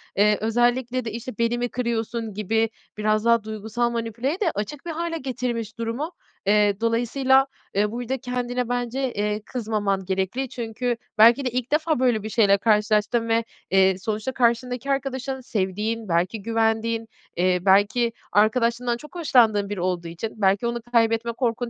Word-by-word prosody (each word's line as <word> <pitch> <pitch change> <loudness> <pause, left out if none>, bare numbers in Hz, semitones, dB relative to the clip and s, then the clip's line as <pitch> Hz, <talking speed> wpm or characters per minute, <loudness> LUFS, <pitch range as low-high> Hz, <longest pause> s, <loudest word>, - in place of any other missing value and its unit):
Eee, 210 +1 +4
özellikle 240 +2 +1
de, 225 - -3
işte, 235 +1 -7
"Beni 235 +1 +1
mi 245 0 -1
kırıyorsun?" 230 -2 -2
gibi 220 +2 0 0.3
biraz 215 +1 +1
daha 235 -2 +4
duygusal 220 +2 -2
manipüleye 235 - -2
de 360 -6 +1
açık 240 +9 -5
bir 340 - -3
hâle 330 +1 -3
getirmiş 245 -5 -4
durumu. 230 +8 -3 0.3
Eee, 205 0 +3
dolayısıyla, 255 +4 +3 0.3
eee, 205 +1 +1
burada 245 +3 -3
kendine 250 -1 -3
bence, 245 +1 -1
eee, 210 +1 -1
kızmaman 210 -5 -2
gerekli. 190 +8 -2
Çünkü 240 0 -3 0.2
belki 235 +5 +6
de - - +1
ilk 255 +1 -3
defa 310 -1 +1
böyle 245 -5 +2
bir 215 - -4
şeyle 205 -3 +4
karşılaştın 215 +2 +2
ve, 225 0 +2 0.3
eee, 190 -1 +4
sonuçta 215 +4 -3
karşındaki 250 +1 0
arkadaşın 270 -1 -2
sevdiğin, 215 +1 -2
belki 180 +6 0
güvendiğin, 225 +1 0 0.3
eee, 180 +1 +2
belki 205 +5 +3 0.2
arkadaşlığından 235 +3 +2
çok 300 +7 -14
hoşlandığın 230 - +3
biri 205 -3 -3
olduğu 175 -1 -1
için 170 +7 -5
belki 200 +4 +3
onu 235 0 -2
kaybetme 230 0 +2
korkun 240 0 -1
230 Hz, 155 wpm, -24 LUFS, 210-250 Hz, 0.3 s, belki